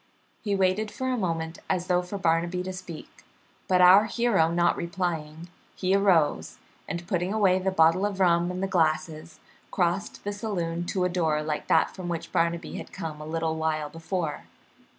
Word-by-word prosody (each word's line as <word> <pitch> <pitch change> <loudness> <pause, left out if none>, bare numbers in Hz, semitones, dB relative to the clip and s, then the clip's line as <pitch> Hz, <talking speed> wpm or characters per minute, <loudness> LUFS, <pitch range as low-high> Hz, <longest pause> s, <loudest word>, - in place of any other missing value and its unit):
He 205 -2 -1
waited 195 +3 +1
for 260 +3 -4
a 255 - +1
moment, 165 -6 -3
as 180 -2 0
though 180 -1 +2
for 180 +3 -6
Barnaby 170 0 0
to 185 0 -5
speak, 175 -4 -10 0.4
but 180 -1 +3
our 185 +4 +8
hero 215 -8 +2
not 175 0 +2
replying, 170 -2 -4 0.3
he 185 +1 0
arose 190 -6 +2 0.3
and, 170 +2 -5
putting 180 -2 -1
away 195 -4 +3
the 190 +1 0
bottle 165 +1 +3
of 200 -2 -6
rum 175 -1 +3
and 180 +1 -4
the - - +1
glasses, 160 -2 -1 0.3
crossed 180 +2 -1
the 205 - -3
saloon 175 -5 -3
to 185 -3 0
a - - +1
door 160 -4 0
like 150 -1 -3
that - - +3
from 185 -2 -6
which 165 -1 -4
Barnaby 170 0 -1
had - - -8
come 155 -2 -6
a 150 - -8
little 160 0 -2
while 155 -1 -1
before. 165 -1 -4
175 Hz, 180 wpm, -26 LUFS, 165-190 Hz, 0.4 s, our